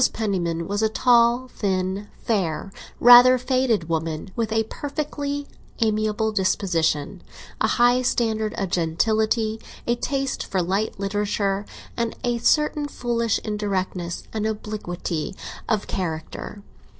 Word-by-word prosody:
Penniman 175 -6 -1
was 205 +1 -1
a 220 - +3
tall, 240 +2 +4
thin, 190 -2 -2 0.2
fair, 195 -4 -1 0.3
rather 245 +1 +9
faded 255 -7 +1
woman, 160 +2 -3
with 225 -2 -1
a 225 0 +2
perfectly 285 +2 -4 0.3
amiable 215 0 +1
disposition, 180 -4 0 0.4
a - - +4
high 245 +1 +4
standard 220 -3 0
of 195 -2 -2
gentility, 220 +6 +1 0.2
a 235 - +2
taste 270 +3 -2
for 190 - -2
light 190 +4 -1
literature, 200 0 -1 0.3
and 235 -1 -2
a 240 -1 0
certain 300 +3 +2
foolish 235 -4 0
indirectness 190 -5 -2
and 215 -1 -1
obliquity 195 -6 -4 0.3
of 215 -2 +1
character. 175 +3 -5
215 Hz, 115 wpm, -23 LUFS, 190-235 Hz, 0.4 s, rather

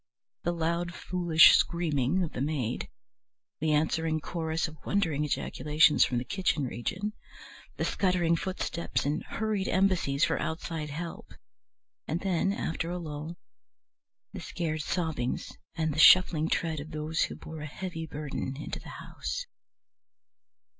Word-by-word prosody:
The 175 - 0
loud 170 +1 -1
foolish 175 -3 +6
screaming 165 0 +1
of 165 - -3
the 125 - -4
maid, 135 -5 -2 0.7
the 155 0 +1
answering 160 +1 +1
chorus 160 0 -2
of 155 -2 -13
wondering 165 -8 +1
ejaculations 150 +1 +3
from 125 - 0
the 120 - 0
kitchen 165 0 0
region, 180 - -3 0.6
the - - 0
scuttering 180 -4 +2
footsteps 170 -3 -2
and 150 +3 -1
hurried 215 -3 -2
embassies 180 -7 +2
for 165 - +2
outside 160 -1 -3
help, 165 +3 -7 0.7
and 165 - -1
then, 190 0 +1
after 165 -4 -2
a 180 - -2
lull, 155 0 -6 1.0
the 190 - -6
scared 160 -2 -3
sobbings 155 -6 -2 0.2
and 160 -3 0
the 155 - -3
shuffling 160 -2 +7
tread 160 -2 0
of 145 +2 -7
those 155 +1 0
who - - -7
bore 160 -1 -9
a 150 - -5
heavy 165 0 -5
burden 145 -3 -4
into 150 - -5
the - - -11
house. - - -5
160 Hz, 140 wpm, -29 LUFS, 150-175 Hz, 1.0 s, shuffling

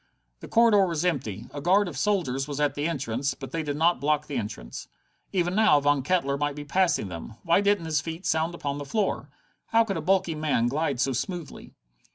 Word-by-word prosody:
The - - -10
corridor 220 -4 +5
was 170 0 -2
empty. 110 - -2
A 145 - -5
guard 190 +5 +3
of 170 - -6
soldiers 135 -6 0
was 145 -1 -4
at 145 -2 +2
the 145 +2 -1
entrance, 135 -3 -2
but 135 - -9
they 165 - -2
did 145 -2 -3
not 170 0 +3
block 150 +1 +1
the 145 - -6
entrance. 80 - -5 0.4
Even 175 -1 0
now 210 -7 +5
Von 145 -1 +2
Kettler 140 -2 0
might 145 -1 -1
be 145 0 -7
passing 175 - +1
them! 90 +5 -8
Why 170 +3 +3
didn't 205 -4 +2
his 155 -3 0
feet 165 +4 -7
sound 160 +2 0
upon 145 -3 -3
the - - -4
floor? 210 +6 -1 0.4
How 230 0 +4
could 200 -4 -3
a - - -3
bulky 190 -2 +2
man 150 -6 +1
glide 145 -1 -1
so 135 +1 +1
smoothly? 170 - -5
150 Hz, 210 wpm, -26 LUFS, 140-180 Hz, 0.4 s, corridor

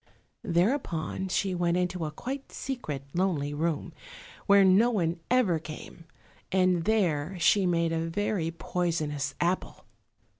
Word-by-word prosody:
Thereupon 180 - 0
she 190 +1 0
went 175 -1 +1
into 180 -2 -1
a - - -2
quite 265 - -6
secret, 155 - -5
lonely 170 -6 0
room, 160 +2 -2 0.5
where 200 -1 +7
no 195 +6 +5
one 170 -7 0
ever 225 -10 +3
came, 155 +1 -10 0.5
and 185 -2 +2
there 185 -5 +1
she 185 +3 +4
made 170 -1 +1
a 165 0 -1
very 185 -2 -1
poisonous 165 -4 -2
apple. 175 +2 -1
175 Hz, 125 wpm, -28 LUFS, 165-195 Hz, 0.5 s, where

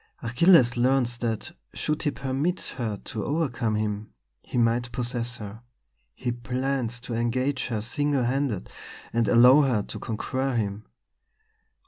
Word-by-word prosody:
Achilles 125 0 +5
learns 125 -1 +2
that, 115 -3 -3 0.2
should 150 +1 -1
he 150 - +1
permit 140 +6 -2
her 110 -5 -2
to 110 -2 -4
overcome 130 -7 0
him, 105 0 -2 0.3
he - - -5
might 120 +1 +2
possess 120 -1 -1
her. 105 +1 -8 0.5
He 125 - -2
plans 125 +1 -2
to 125 -1 -6
engage 130 +4 0
her 110 -4 -2
single 145 +3 0
handed, 125 -5 -1 0.5
and 115 -1 +2
allow 125 +5 +7
her 125 -7 +1
to - - -7
conquer 130 +4 -2
him. 105 -2 -2
120 Hz, 135 wpm, -26 LUFS, 115-135 Hz, 0.5 s, allow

